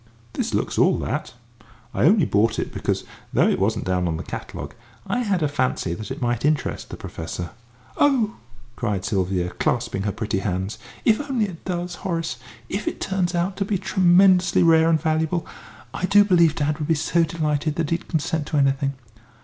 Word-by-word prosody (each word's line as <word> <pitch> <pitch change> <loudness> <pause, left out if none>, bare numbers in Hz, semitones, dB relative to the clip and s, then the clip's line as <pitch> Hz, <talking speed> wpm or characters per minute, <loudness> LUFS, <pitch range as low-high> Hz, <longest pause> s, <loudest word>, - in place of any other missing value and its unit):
"This - - -2
looks - - -1
all - - +4
that. - - -3 0.6
I - - +2
only 190 0 +5
bought 110 0 +2
it - - -3
because, - - -1 0.3
though - - +3
it - - +1
wasn't 105 +3 0
down 90 -1 0
on 80 -1 -1
the - - -5
catalogue, 70 +3 -7 0.3
I 245 - -1
had 200 -8 0
a - - +3
fancy 130 - -1
that 105 +3 -6
it - - -5
might 120 -1 0
interest 150 -1 0
the - - -7
Professor." 85 +2 -6 0.5
"Oh!" 255 -7 +2 0.4
cried 105 -5 -2
Sylvia, 95 -3 0
clasping 120 -5 -1
her 100 +1 -1
pretty 105 -2 -2
hands, 95 +1 -3 0.3
"if 220 +3 +4
only 240 -5 +1
it 180 -5 -9
does, 175 -1 -3
Horace! 165 -9 -2 0.3
If 195 +9 -4
it - - -2
turns 185 -2 -1
out 175 +3 0
to 195 - +1
be 195 0 0
tremendously 185 -1 +4
rare 165 -1 +5
and 160 -1 +3
valuable! 160 +1 0 0.5
I 185 - -1
do 205 +1 +6
believe 170 -5 +4
dad 150 +1 -1
would 150 - -2
be 165 - +3
so 165 +3 +2
delighted 155 -2 -1
that 165 -3 -2
he'd 170 - -1
consent 160 -1 -1
to 155 - -1
anything. 135 0 +2
155 Hz, 190 wpm, -23 LUFS, 110-180 Hz, 0.6 s, do